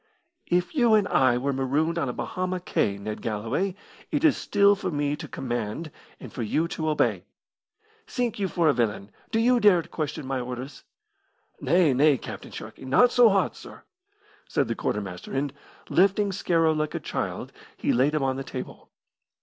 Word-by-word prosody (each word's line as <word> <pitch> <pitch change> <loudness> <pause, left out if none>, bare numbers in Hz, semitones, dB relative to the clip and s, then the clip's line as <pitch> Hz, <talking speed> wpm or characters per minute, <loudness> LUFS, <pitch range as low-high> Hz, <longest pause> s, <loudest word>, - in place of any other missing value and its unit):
"If 180 0 0
you 240 -7 +4
and 210 -2 +3
I 130 -2 +3
were 140 +3 -1
marooned 145 +6 0
on 140 - -1
a - - -3
Bahama 185 +5 -3
cay, 100 - 0
Ned 105 +1 -6
Galloway, 115 - -2 0.3
it 295 0 -1
is 310 -3 +5
still 200 0 +3
for 190 -1 -3
me 145 -2 -1
to - - -8
command 120 +5 -4 0.3
and - - -10
for 125 - -5
you 155 +9 0
to 155 -2 -2
obey. 150 - +1 0.8
Sink 245 -4 -2
you 195 - +1
for 170 -3 +1
a 150 - +5
villain, 105 -4 -1 0.2
do 225 - 0
you 245 +2 +4
dare 195 -6 +5
to - - -16
question 150 -2 -4
my 135 0 -2
orders?" 125 +2 -6 0.8
"Nay, 170 -5 +3
nay, 140 +2 +4
Captain - - -8
Sharkey, - - -9
not 190 - +4
so 245 -2 +6
hot, 195 -1 +1
sir!" - - -12 0.7
said 140 - +1
the 115 - -1
quartermaster, 95 -5 -4
and, 135 0 -1 0.3
lifting 200 +2 +3
Scarrow 165 -4 +2
like 155 0 -2
a - - -1
child, - - -4 0.3
he - - 0
laid 135 +5 +2
him 150 - 0
on 135 -1 0
the 135 - -4
table. - - -8
155 Hz, 180 wpm, -26 LUFS, 130-190 Hz, 0.8 s, so